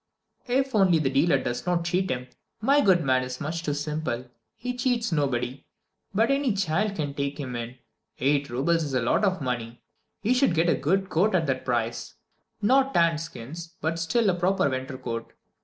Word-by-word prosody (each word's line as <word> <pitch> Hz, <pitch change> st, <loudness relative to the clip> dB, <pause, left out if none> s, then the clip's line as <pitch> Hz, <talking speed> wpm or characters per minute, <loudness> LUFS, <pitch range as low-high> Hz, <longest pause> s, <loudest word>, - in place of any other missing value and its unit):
"If 265 Hz, +2 st, +1 dB
only 190 Hz, -5 st, +5 dB
the 140 Hz, -4 st, 0 dB
dealer 150 Hz, +6 st, +3 dB
does 120 Hz, +6 st, -4 dB
not 175 Hz, -1 st, +1 dB
cheat 185 Hz, +2 st, 0 dB
him. 125 Hz, -1 st, -2 dB, 0.3 s
My 275 Hz, +6 st, +4 dB
good 185 Hz, -6 st, +4 dB
man 130 Hz, -2 st, +3 dB
is 125 Hz, 0 st, -5 dB
much 160 Hz, +2 st, -3 dB
too 150 Hz, -4 st, -2 dB
simple; 145 Hz, -4 st, -3 dB, 0.3 s
he 250 Hz, +1 st, -4 dB
cheats 245 Hz, -3 st, 0 dB
nobody, 135 Hz, -4 st, -1 dB, 0.5 s
but 225 Hz, +6 st, +2 dB
any 275 Hz, -4 st, +2 dB
child 195 Hz, +2 st, 0 dB
can 145 Hz, -5 st, -3 dB
take 140 Hz, +1 st, -3 dB
him 130 Hz, -4 st, -4 dB
in. 120 Hz, +2 st, -5 dB, 0.4 s
Eight 140 Hz, +1 st, +1 dB
roubles 160 Hz, +7 st, +1 dB
is 140 Hz, -3 st, -3 dB
a 125 Hz, -, +2 dB
lot 120 Hz, -, +2 dB
of 190 Hz, -4 st, +1 dB
money 120 Hz, -2 st, -4 dB, 0.4 s
he 225 Hz, +5 st, +2 dB
should 255 Hz, -8 st, +3 dB
get 165 Hz, +2 st, +3 dB
a -, -, +5 dB
good 190 Hz, +8 st, 0 dB
coat 190 Hz, +5 st, +2 dB
at 165 Hz, -3 st, +2 dB
that 135 Hz, -2 st, -2 dB
price. 120 Hz, -2 st, -2 dB, 0.5 s
Not 270 Hz, +5 st, +3 dB
tanned 165 Hz, -2 st, +3 dB
skins, 165 Hz, +3 st, -8 dB
but 165 Hz, +1 st, -1 dB
still 210 Hz, +8 st, +1 dB
a -, -, -1 dB
proper 185 Hz, -1 st, +2 dB
winter 130 Hz, 0 st, -3 dB
coat. 115 Hz, -3 st, -5 dB
160 Hz, 190 wpm, -26 LUFS, 130-195 Hz, 0.5 s, only